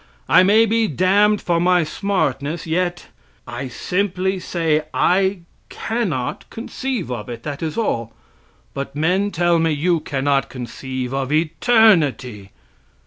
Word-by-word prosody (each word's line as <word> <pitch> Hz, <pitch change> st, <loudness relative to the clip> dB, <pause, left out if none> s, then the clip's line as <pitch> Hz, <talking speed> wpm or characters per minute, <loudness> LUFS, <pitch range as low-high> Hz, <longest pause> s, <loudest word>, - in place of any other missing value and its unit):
I -, -, +6 dB
may 210 Hz, +4 st, +5 dB
be 225 Hz, 0 st, +1 dB
damned 200 Hz, +5 st, +2 dB
for 170 Hz, -1 st, +1 dB
my 180 Hz, 0 st, +3 dB
smartness, 155 Hz, -4 st, -2 dB
yet 175 Hz, +1 st, -2 dB, 0.4 s
I 120 Hz, +3 st, -6 dB
simply 190 Hz, -, -1 dB
say 165 Hz, -4 st, 0 dB
I 190 Hz, 0 st, +2 dB, 0.3 s
cannot 195 Hz, -, -3 dB
conceive 240 Hz, -, -4 dB
of 120 Hz, -1 st, -5 dB
it, 120 Hz, -1 st, -7 dB
that 145 Hz, -2 st, -5 dB
is 160 Hz, +2 st, -3 dB
all. 115 Hz, -, -1 dB, 0.6 s
But 140 Hz, 0 st, -5 dB
men 180 Hz, +7 st, +1 dB
tell 175 Hz, -2 st, +2 dB
me, 165 Hz, 0 st, +2 dB
you 165 Hz, +3 st, +1 dB
cannot 140 Hz, -2 st, -1 dB
conceive 130 Hz, 0 st, -6 dB
of 135 Hz, 0 st, -2 dB
eternity! 155 Hz, -, +2 dB
165 Hz, 130 wpm, -20 LUFS, 135-195 Hz, 0.6 s, I